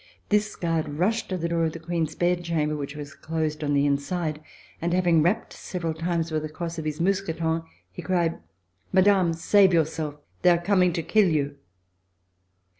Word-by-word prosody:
This 210 Hz, 0 st, +1 dB
guard 165 Hz, -3 st, -1 dB
rushed 185 Hz, +10 st, 0 dB
to 185 Hz, -, -1 dB
the 170 Hz, -1 st, -2 dB
door 170 Hz, 0 st, 0 dB
of 160 Hz, -, -2 dB
the 165 Hz, -, -7 dB
Queen's 165 Hz, -1 st, -2 dB
bed 175 Hz, 0 st, +1 dB
chamber, 155 Hz, -3 st, 0 dB
which 145 Hz, 0 st, -5 dB
was 145 Hz, -1 st, -7 dB
closed 155 Hz, -1 st, -3 dB
on 145 Hz, -1 st, +1 dB
the 140 Hz, 0 st, +3 dB
inside, 150 Hz, +2 st, -1 dB, 0.4 s
and 170 Hz, +1 st, 0 dB
having 175 Hz, -3 st, +4 dB
rapped 190 Hz, +8 st, 0 dB
several 170 Hz, -3 st, -4 dB
times 165 Hz, 0 st, -2 dB
with 155 Hz, -1 st, 0 dB
the 155 Hz, -, -5 dB
cross 165 Hz, +1 st, -5 dB
of 155 Hz, -, -5 dB
his 155 Hz, -1 st, -3 dB
mousqueton, 165 Hz, -3 st, 0 dB, 0.3 s
he -, -, -8 dB
cried: 170 Hz, -1 st, 0 dB, 0.5 s
"Madame, 190 Hz, -2 st, +4 dB
save 190 Hz, +3 st, +4 dB
yourself! 155 Hz, -2 st, 0 dB, 0.3 s
They 180 Hz, -, +5 dB
are 175 Hz, -, +5 dB
coming 180 Hz, 0 st, +3 dB
to 165 Hz, -1 st, -2 dB
kill 210 Hz, +3 st, +3 dB
you!" 145 Hz, -3 st, 0 dB
165 Hz, 185 wpm, -25 LUFS, 155-180 Hz, 0.5 s, They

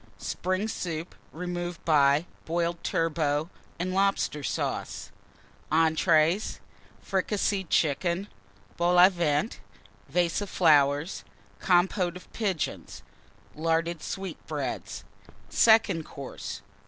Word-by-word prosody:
Spring 185 Hz, +4 st, -2 dB
Soup, 170 Hz, -5 st, -4 dB, 0.2 s
removed 175 Hz, 0 st, -5 dB
by 145 Hz, 0 st, +4 dB, 0.2 s
Boiled 170 Hz, +1 st, -1 dB
Turbot 155 Hz, -2 st, 0 dB, 0.3 s
and 185 Hz, +2 st, -2 dB
Lobster 195 Hz, -6 st, +1 dB
Sauce. -, -, -3 dB, 0.6 s
Entrées 160 Hz, +3 st, +3 dB, 0.5 s
Fricasseed 195 Hz, -1 st, 0 dB
Chicken. 170 Hz, +5 st, +1 dB, 0.5 s
Vol 175 Hz, +1 st, +3 dB
au 180 Hz, +1 st, +9 dB
Vent. 170 Hz, +2 st, 0 dB, 0.5 s
Vase 175 Hz, +1 st, +1 dB
of 205 Hz, -, -4 dB
Compôte 175 Hz, +4 st, +1 dB
of 180 Hz, -, -13 dB
Pigeons. 195 Hz, -8 st, -3 dB, 0.5 s
Flowers. 155 Hz, -, -10 dB
Larded 165 Hz, 0 st, +1 dB
Sweetbreads. 195 Hz, -1 st, -5 dB, 0.5 s
_Second 220 Hz, -7 st, +4 dB
Course. 140 Hz, -3 st, -8 dB
170 Hz, 90 wpm, -27 LUFS, 160-185 Hz, 0.6 s, au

